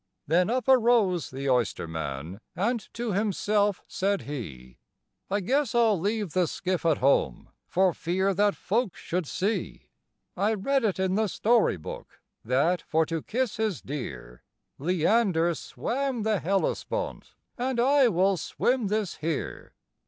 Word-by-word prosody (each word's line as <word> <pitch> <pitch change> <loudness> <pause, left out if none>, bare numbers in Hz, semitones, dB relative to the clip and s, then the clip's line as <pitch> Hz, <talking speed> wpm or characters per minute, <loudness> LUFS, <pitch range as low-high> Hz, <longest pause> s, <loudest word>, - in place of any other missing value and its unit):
Then 175 +6 +2
up 255 +2 -1
arose 230 - +4
the 135 +1 -5
oysterman, 80 - -2 0.2
and 220 +4 -1
to 235 -1 -2
himself 205 0 +1
said 200 +1 -1
he, 65 - -8 0.5
"I 200 +1 0
guess 260 +5 0
I 240 - +5
'll 215 -5 +3
leave 205 -1 -1
the 180 -2 +2
skiff 180 +1 -2
at 160 - +3
home, 125 - +1 0.2
for 185 -1 +2
fear 190 +5 0
that 205 +2 +2
folks 220 -1 -1
should 175 -2 -3
see 205 +7 -3 0.5
I 205 +4 +1
read 270 +6 0
it 210 -4 +1
in 190 -1 +1
the 215 +2 +2
story 225 - +2
book, 75 - -9 0.2
that, 140 +9 +1
for 160 +1 +1
to 165 0 -3
kiss 240 - -2
his 215 -6 -1
dear, 65 - -7 0.4
Leander 175 - +2
swam 255 - -3
the 215 -2 +1
Hellespont, 200 - -2 0.2
and 250 0 -2
I 270 +2 +5
will 190 -1 +2
swim 245 - 0
this 210 -2 -1
here." 160 -1 -4
190 Hz, 145 wpm, -27 LUFS, 160-225 Hz, 0.5 s, I